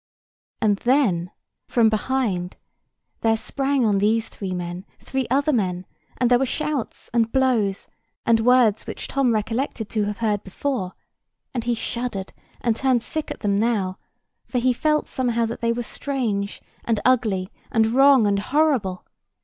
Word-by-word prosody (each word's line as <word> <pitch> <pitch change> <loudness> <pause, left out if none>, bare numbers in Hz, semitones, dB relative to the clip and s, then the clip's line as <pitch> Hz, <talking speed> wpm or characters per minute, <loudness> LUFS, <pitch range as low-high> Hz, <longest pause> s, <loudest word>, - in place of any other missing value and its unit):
And 205 -2 +3
then, 210 -9 +2 0.4
from 235 -2 +3
behind, 215 -5 -1 0.6
there 225 -1 +2
sprang 270 +2 0
on 205 -2 +2
these 220 +2 +1
three 195 -2 -6
men 175 +1 -5
three 265 -2 -3
other 280 +4 +2
men; 185 -6 -1 0.3
and 250 - +2
there 245 - +6
were 270 - +2
shouts, 300 -2 -3
and 230 -1 +2
blows, 235 -7 +1 0.4
and 230 -1 +4
words 235 -2 +3
which - - -6
Tom 270 -3 +1
recollected 225 +1 -2
to 215 -2 0
have 205 0 -3
heard 210 -3 0
before; 190 -1 -3 0.6
and 240 -3 -3
he 240 0 +1
shuddered 230 -4 -3 0.3
and 235 -2 +1
turned 255 -2 +1
sick 310 -1 -2
at - - -7
them 200 -2 +1
now, 200 -4 0 0.4
for 255 - -4
he 250 +1 +3
felt 300 +4 +1
somehow 235 -3 0
that 230 +1 -5
they 230 0 +2
were 240 +1 -2
strange, 225 -7 -3 0.2
and 225 -3 0
ugly, 215 -7 +2 0.2
and 225 -1 +3
wrong, 265 +1 +5
and 200 -1 +2
horrible. 255 -7 +1
230 Hz, 155 wpm, -23 LUFS, 205-255 Hz, 0.6 s, there